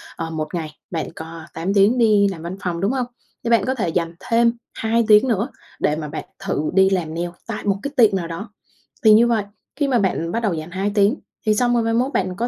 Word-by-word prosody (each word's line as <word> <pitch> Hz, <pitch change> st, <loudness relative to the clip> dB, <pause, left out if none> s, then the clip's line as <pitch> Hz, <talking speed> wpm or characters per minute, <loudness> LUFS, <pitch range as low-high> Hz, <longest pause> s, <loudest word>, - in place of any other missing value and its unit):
ờ, 165 Hz, -, -4 dB
1 155 Hz, 0 st, -4 dB
ngày 160 Hz, -3 st, -3 dB, 0.2 s
bạn 165 Hz, -3 st, -3 dB
có 165 Hz, +1 st, -8 dB
8 175 Hz, +5 st, -2 dB
tiếng 205 Hz, +5 st, +4 dB
đi 210 Hz, -3 st, +4 dB
làm 190 Hz, -5 st, -4 dB
văn 170 Hz, +3 st, -6 dB
phòng, 170 Hz, -2 st, -2 dB
đúng 200 Hz, +4 st, +1 dB
hông? 260 Hz, -2 st, 0 dB, 0.4 s
Thì 230 Hz, -, -2 dB
bạn 230 Hz, -, +4 dB
có 260 Hz, -, 0 dB
thể 210 Hz, -9 st, -1 dB
dành 165 Hz, 0 st, -1 dB
thêm 235 Hz, +2 st, +2 dB, 0.2 s
2 230 Hz, +1 st, +1 dB
tiếng 215 Hz, +3 st, +6 dB
nữa 225 Hz, 0 st, +1 dB, 0.3 s
để 150 Hz, -, +1 dB
mà 155 Hz, -1 st, -5 dB
bạn 150 Hz, +2 st, -6 dB, 0.2 s
thử 155 Hz, -, -1 dB
đi 190 Hz, 0 st, +5 dB
làm 175 Hz, -5 st, -1 dB
nail 170 Hz, +1 st, -2 dB, 0.2 s
tại 230 Hz, -, -4 dB
một 200 Hz, -1 st, +1 dB
cái 280 Hz, -, -3 dB
tiệm 220 Hz, -5 st, +5 dB
nào 175 Hz, -3 st, -2 dB
đó, 200 Hz, +6 st, -7 dB, 0.5 s
thì 215 Hz, -1 st, +8 dB
như 230 Hz, +3 st, +6 dB
vậy, 230 Hz, -3 st, +1 dB, 0.3 s
khi 285 Hz, -2 st, 0 dB
mà 250 Hz, -3 st, +2 dB
bạn 170 Hz, -4 st, 0 dB
bắt 230 Hz, -, 0 dB
đầu 205 Hz, -5 st, +1 dB
dành 160 Hz, +1 st, -5 dB
2 195 Hz, +2 st, -1 dB
tiếng, 205 Hz, +4 st, +4 dB, 0.3 s
thì 215 Hz, -1 st, +3 dB
xong 245 Hz, +2 st, +2 dB
rồi 235 Hz, -1 st, +2 dB
mai 225 Hz, -, 0 dB
mốt 255 Hz, +4 st, +1 dB
bạn 185 Hz, -5 st, 0 dB
có 235 Hz, +4 st, -1 dB
200 Hz, 255 wpm, -21 LUFS, 170-230 Hz, 0.5 s, thì